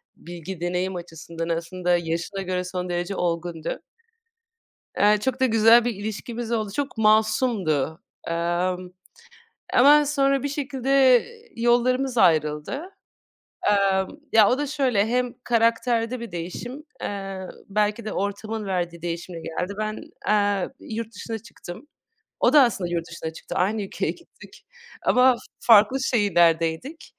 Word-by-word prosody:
bilgi, 175 +1 -9
deneyim 180 +2 -1
açısından 165 -1 -7
aslında 175 +2 0
yaşına 170 +3 -3
göre 185 -1 -2
son 180 0 -4
derece 175 +2 -2
olgundu. 170 -2 -3 1.2
Eee, 210 +1 +5
çok 260 +3 -2
da 260 - +4
güzel 225 0 +6
bir 240 -1 -1
ilişkimiz 220 +3 -5
oldu. 215 -3 -1
Çok 280 -5 -3
masumdu. 215 - +2 0.3
Aaa, 175 +2 0
ımm, 180 0 -10 0.8
ama 290 +4 +6
sonra 275 -2 +1
bir - - 0
şekilde 270 -2 +3 0.3
yollarımız 245 +2 +1
ayrıldı. 155 - +2 0.9
Eee, 195 -2 +3 0.3
ya 220 -2 +6
o 250 - +2
da 290 +1 -2
şöyle, 255 -8 +1
hem 250 +1 0
karakterde 230 +1 +1
bir 235 -1 -7
değişim, 205 - -6 0.2
eee, 195 -1 -5 0.3
belki 210 +2 0
de 215 - -4
ortamın 210 +2 -3
verdiği 175 -3 -3
değişimle 170 0 -5
geldi. 180 +4 -4
Ben, 215 0 -3 0.3
eee, 205 -2 +2
yurt 225 0 -6
dışına 225 +1 -5
çıktım. 220 - -11 0.5
O - - +3
da 295 - +8
aslında 195 -7 -1
yurt 170 0 -2
dışına 165 -1 -6
çıktı. - - -8
Aynı 210 +4 +1
ülkeye 195 - -2
gittik - - -16 0.4
ama 255 +1 +5
f 235 - -8 0.2
farklı 225 +3 +5
şehirlerdeydik. 175 - +1
205 Hz, 130 wpm, -24 LUFS, 175-240 Hz, 1.2 s, da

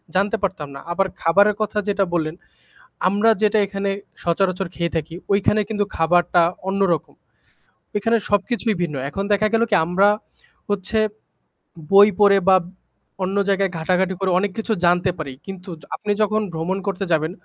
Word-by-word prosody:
জানতে 200 +4 +1
পারতাম 185 -6 -2
না। - - -7
আবার 195 +2 +1
খাবারের 200 +5 +4
কথা 215 0 -2
যেটা 200 -1 +1
বললেন, 160 -2 -1 0.7
আমরা 205 +4 +3
যেটা 215 0 +3
এখানে 195 0 -3 0.3
সচরাচর 185 +2 0
খেয়ে 170 -1 -2
থাকি, 160 +1 -3 0.2
ওইখানে 205 +2 +2
কিন্তু 210 -2 0
খাবারটা 175 +1 +3 0.3
অন্যরকম। 195 -5 0 0.8
ওইখানে 225 +3 +2
সবকিছুই 215 +2 0
ভিন্ন। 155 -4 -2
এখন 195 +6 -4
দেখা 215 +1 +3
গেল 225 - +3
কি - - +3
আমরা 190 +4 +3 0.6
হচ্ছে, 205 +2 -1 0.9
বই 200 +1 +8
পড়ে 200 -1 +6
বা 190 - +7 0.7
অন্য 190 +2 -1
জায়গায় 195 -1 +1
ঘাঁটাঘাঁটি 185 +3 0
করে 195 - 0
অনেক 200 0 -1
কিছু 225 0 -1
জানতে 175 +1 +3
পারি, 140 -4 -6
কিন্তু 190 -1 -9 0.3
আপনি 210 - -3
যখন 215 +1 +2
ভ্রমণ 165 +4 -2
করতে 195 0 -2
যাবেন, 160 0 +1
195 Hz, 150 wpm, -21 LUFS, 175-205 Hz, 0.9 s, বই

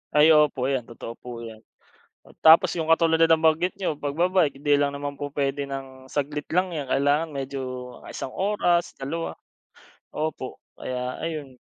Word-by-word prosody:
Ay 150 +1 +7
opo 150 -4 +4
'yan, 130 -4 -2
totoo 115 0 -8
po 120 -1 -8
'yan. 110 -1 -9 0.8
Tapos 160 +1 +7
'yung 160 -2 -3
katulad 165 0 +4
ng 165 - +6
nabanggit 160 +3 +2
niyo 185 -5 -1
pagba-bike, 160 0 +1
'di 145 -1 +3
lang 145 - +2
naman 145 0 -4
po 145 0 -3
puwede 140 0 -2
ng 135 -1 -7
saglit 145 +1 -3
lang 180 +1 +1
'yan 145 -5 -4
kailangan 145 +4 +2
medyo 140 -1 -5 0.5
isang 130 - -6
oras, 185 -3 +1
dalawa, 165 +5 -4 0.7
opo 150 -4 -4 0.2
kaya 125 0 -4
ayun. 150 -6 -5
145 Hz, 155 wpm, -25 LUFS, 135-165 Hz, 0.8 s, Ay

